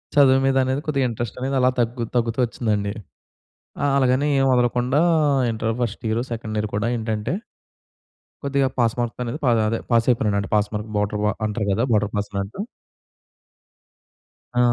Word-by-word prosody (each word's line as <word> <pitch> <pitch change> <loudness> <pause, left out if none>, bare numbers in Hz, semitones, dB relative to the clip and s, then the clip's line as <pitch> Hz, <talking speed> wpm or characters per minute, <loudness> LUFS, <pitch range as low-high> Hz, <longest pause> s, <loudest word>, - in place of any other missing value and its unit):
చదువు 135 -2 +6
మీద 135 0 +2
అనేది 130 +2 -1
కొద్దిగా 140 -4 +1
ఇంట్రెస్టనేది 120 +4 -3
అలా 125 0 +4
తగ్గు 120 0 0
తగ్గుతూ 115 0 0
ఒచ్చిందండి. 105 -4 -1 0.9
ఆహ్, 140 0 +2
అలాగని 130 +2 +2
ఏం 135 - +3
వదలకుండా 125 +3 +2 0.5
inter 110 0 -1
first 115 -3 -3
year, 110 +2 0
second 110 -2 -4
year 105 - -1
కూడా 105 +2 0
ఏంటంటే 110 0 -2 1.1
కొద్దిగా 140 -1 +1
పాస్ 115 -2 +3
మార్క్‌తో 120 0 -2
అనేది 125 +5 -4
ప - - +1 0.2
అదే 115 - -1
పాస్ 115 -1 +4
అయిపోయినాడంట 105 -4 +1
పాస్ 105 0 +2
మార్క్ 105 +1 -4
బోర్డర్‌వా 105 +1 0
అంటారు 105 -1 -2
కదా! 110 +5 +1
బోర్డర్ 105 -1 +1
పాస్ 105 0 -2
అంట. 100 - -11 2.0
ఆ! - - +4
115 Hz, 150 wpm, -22 LUFS, 105-130 Hz, 2.0 s, చదువు